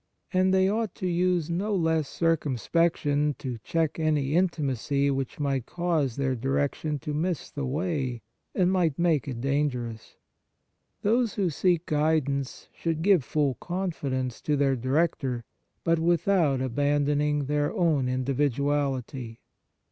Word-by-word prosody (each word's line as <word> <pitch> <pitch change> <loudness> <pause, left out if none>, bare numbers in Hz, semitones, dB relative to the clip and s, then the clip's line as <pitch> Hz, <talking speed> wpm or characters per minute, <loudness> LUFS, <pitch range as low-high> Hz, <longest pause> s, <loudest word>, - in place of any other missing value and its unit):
And 185 0 +3
they 190 0 +4
ought 215 0 -1
to - - -5
use 175 -2 +1
no 200 +5 0
less 160 -4 +1
cir 165 -1 +2
cumspection 150 +1 0
to 125 -5 -5
check 160 +7 -1
any 150 -3 +1
intimacy 140 -5 +1
which 135 0 -3
might 135 -4 -1
cause 165 -8 0
their 135 -2 0
direction 140 +4 -1
to 150 - -4
miss 170 +2 -2
the 140 -3 -3
way, 140 -5 -2 0.3
and 180 -1 +3
might 170 -6 +1
make 165 -6 +2
it 125 -4 -4
dangerous. 125 -5 -2 0.9
Those 230 +2 +2
who 190 -4 +1
seek 175 +2 +1
guidance 150 -4 0
should 165 -1 -2
give 190 -6 +4
full 145 0 +1
confidence 140 - -3
to 150 - 0
their 135 -1 +2
director, 130 -1 0 0.4
but 165 0 +2
without 165 -4 +2
abandoning 145 +2 +1
their 145 +1 0
own 165 - +1
individuality. 135 -2 -1
150 Hz, 135 wpm, -27 LUFS, 135-170 Hz, 0.9 s, they